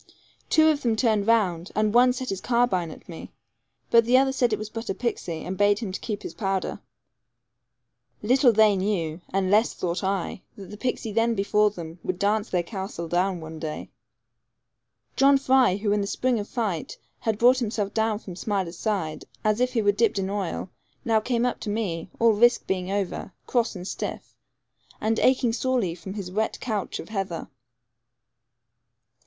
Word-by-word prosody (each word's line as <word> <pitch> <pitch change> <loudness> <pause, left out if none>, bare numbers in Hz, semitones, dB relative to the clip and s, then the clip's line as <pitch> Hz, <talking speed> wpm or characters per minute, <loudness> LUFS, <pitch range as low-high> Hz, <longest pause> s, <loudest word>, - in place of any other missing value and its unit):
Two 315 0 +5
of 300 -2 +1
them 230 -3 +1
turned 220 -3 +1
round, 190 -6 +2
and 215 0 +1
one 250 +1 +6
set 255 0 -4
his 190 -1 -4
carbine 235 -8 +1
at - - -12
me, 165 - -9 0.6
but 230 0 +7
the 245 +3 +4
other 265 0 +3
said 250 -3 +1
it 215 - +1
was 215 - -5
but 225 +1 -6
a 195 - -1
pixie, 180 -8 -3
and 190 +1 -5
bade 205 0 +4
him 210 -4 -4
keep 210 +2 -5
his - - -6
powder. 195 -3 -2 1.4
Little 255 +3 +5
they 215 -2 +5
knew, 185 -4 -1
and 190 -1 0
less 215 +3 +3
thought 180 +2 -2
I, 190 -1 -2 0.2
that 195 -2 -10
the 210 - -8
pixie 245 -2 -2
then 230 +2 +2
before 210 +1 +3
them 170 -4 -9
would 185 - -3
dance 205 +3 +1
their 180 -2 0
castle 190 -3 -5
down 180 +1 0
one 160 0 -8
day. 155 -1 -6 1.2
John 275 +1 +5
Fry, 260 -6 +4
who 205 +1 -1
in 205 0 +2
the 200 - -2
spring 245 +2 0
of 205 - -6
fright 210 -10 -3 0.2
had 220 -2 -1
brought 250 +3 +5
himself 210 -4 -2
down 220 -1 +1
from 190 -4 -9
Smiler's 190 -3 -3
side, 190 -8 -2 0.2
as 215 +1 +2
if 250 0 +1
he 225 -3 +1
were 205 - +5
dipped 210 +1 +1
in 195 0 -1
oil, 195 -2 -3 0.3
now 225 -1 +3
came 235 +2 0
up 250 - -1
to 215 - -5
me, 195 -6 -2
all 230 0 +5
risk 240 +3 +4
being 185 -1 -2
over, 195 -1 -3
cross, 235 -3 0
and 180 0 -7
stiff, - - -5 0.6
and 220 +1 0
aching 255 -3 +3
sorely 245 -8 0
from 185 +3 -8
his 190 -4 -5
wet 220 +3 -1
couch 215 -6 -3
of - - -9
heather. 195 -7 -4
210 Hz, 185 wpm, -25 LUFS, 190-235 Hz, 1.4 s, but